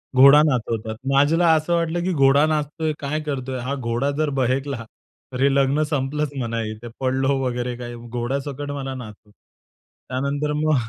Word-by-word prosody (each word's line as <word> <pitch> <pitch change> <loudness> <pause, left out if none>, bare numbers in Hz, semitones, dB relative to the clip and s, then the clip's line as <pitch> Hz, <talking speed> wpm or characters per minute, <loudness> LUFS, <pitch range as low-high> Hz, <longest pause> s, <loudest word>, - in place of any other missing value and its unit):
घोडा 140 +3 +8
नाचवतात. 115 -6 -1 0.2
माझ्याला 160 +5 +4
असं 155 +2 0
वाटलं, 170 0 0
की 185 - 0
घोडा 140 +1 +5
नाचतोय, 155 +1 -1
काय 145 +2 -2
करतोय. 130 -3 -4
हा 130 +3 -3
घोडा 120 +1 -1
जर 155 -1 +1
बहेकला 130 0 -1 0.5
तर 125 - -3
हे 140 0 +4
लग्न 140 +2 +3
संपलंच 145 +1 -1
म्हणा. 115 -2 -2
इथे 110 +2 -9
पडलो 135 +1 +1
वगैरे, 125 0 -2
काही 120 -1 -7
घोड्यासकट 130 +5 -4
मला 135 -2 -4
नाचतो. 110 -3 -11
त्यानंतर 140 +7 -6
मग, 155 0 +2
135 Hz, 155 wpm, -22 LUFS, 125-150 Hz, 0.5 s, घोडा